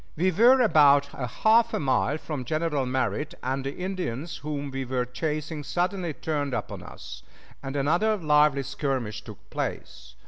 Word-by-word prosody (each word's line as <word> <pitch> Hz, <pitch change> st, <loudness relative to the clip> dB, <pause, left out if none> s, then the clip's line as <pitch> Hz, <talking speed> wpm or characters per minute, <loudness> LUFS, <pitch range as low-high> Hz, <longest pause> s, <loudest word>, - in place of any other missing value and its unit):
We 185 Hz, +4 st, +2 dB
were 240 Hz, +8 st, +6 dB
about 145 Hz, -, +6 dB, 0.4 s
half 230 Hz, +1 st, +5 dB
a -, -, 0 dB
mile 135 Hz, -1 st, +1 dB
from 150 Hz, -4 st, -5 dB
General 150 Hz, -1 st, -1 dB
Merritt, 130 Hz, +2 st, -1 dB
and 130 Hz, +1 st, -1 dB
the 135 Hz, +1 st, -4 dB
Indians 175 Hz, -5 st, -4 dB
whom 145 Hz, -1 st, -4 dB
we 135 Hz, 0 st, -3 dB
were 125 Hz, -1 st, -1 dB
chasing 150 Hz, +3 st, -3 dB
suddenly 180 Hz, +2 st, -1 dB
turned 145 Hz, -4 st, -2 dB
upon -, -, -5 dB
us, -, -, -10 dB, 0.4 s
and 135 Hz, 0 st, -6 dB
another 175 Hz, +10 st, +2 dB
lively 150 Hz, -4 st, +3 dB
skirmish 125 Hz, -7 st, -3 dB
took 105 Hz, -2 st, -12 dB
place. 65 Hz, 0 st, -5 dB
145 Hz, 150 wpm, -26 LUFS, 130-170 Hz, 0.4 s, were